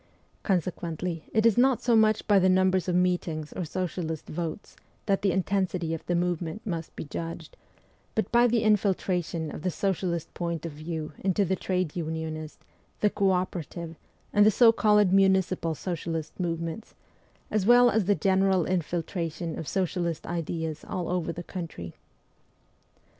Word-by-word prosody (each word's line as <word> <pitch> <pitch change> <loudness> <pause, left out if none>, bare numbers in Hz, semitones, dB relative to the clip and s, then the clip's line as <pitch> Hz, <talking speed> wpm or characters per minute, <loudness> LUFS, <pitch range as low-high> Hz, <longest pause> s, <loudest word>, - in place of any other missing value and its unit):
Consequently 175 -2 -2
it 220 0 +2
is 230 0 +5
not 260 -1 +4
so 240 -2 +3
much 215 -1 +3
by 205 -2 +6
the 185 0 +4
numbers 185 0 +3
of 180 - +1
meetings 175 -4 0
or 185 - -3
socialist 165 -2 -3
votes 165 +3 -5 0.3
that 195 -2 +1
the 195 - +2
intensity 185 -3 0
of 165 - -5
the 175 - +1
movement 175 +2 -2
must 165 -5 -4
be - - -5
judged, 165 - -6 0.6
but 220 - -1
by 240 +1 +5
the 235 -1 +1
infiltration 185 -6 +1
of - - -7
the 185 - 0
socialist 180 -3 -2
point 170 -2 -3
of 165 - -4
view 155 +1 -5
into 195 +1 +1
the 190 +1 0
trade 185 -3 -2
unionist, 160 -2 -4 0.4
the 210 - +3
co 195 -1 +2
operative, 175 -2 -2 0.4
and 205 - +6
the 210 - +7
so 230 +2 +6
called 210 -4 +3
municipal 190 -4 +3
socialist 165 -1 -4
movements, 170 +3 -3 0.6
as 210 -2 +1
well 245 0 +7
as 220 -3 +1
the 205 +2 +3
general 190 -3 +2
infiltration 170 -1 -2
of 160 - -6
socialist 175 -3 -1
ideas 160 -2 -3
all 180 -2 -4
over 175 -2 -1
the 175 +1 -7
country. 165 - -7
180 Hz, 155 wpm, -27 LUFS, 165-195 Hz, 0.6 s, the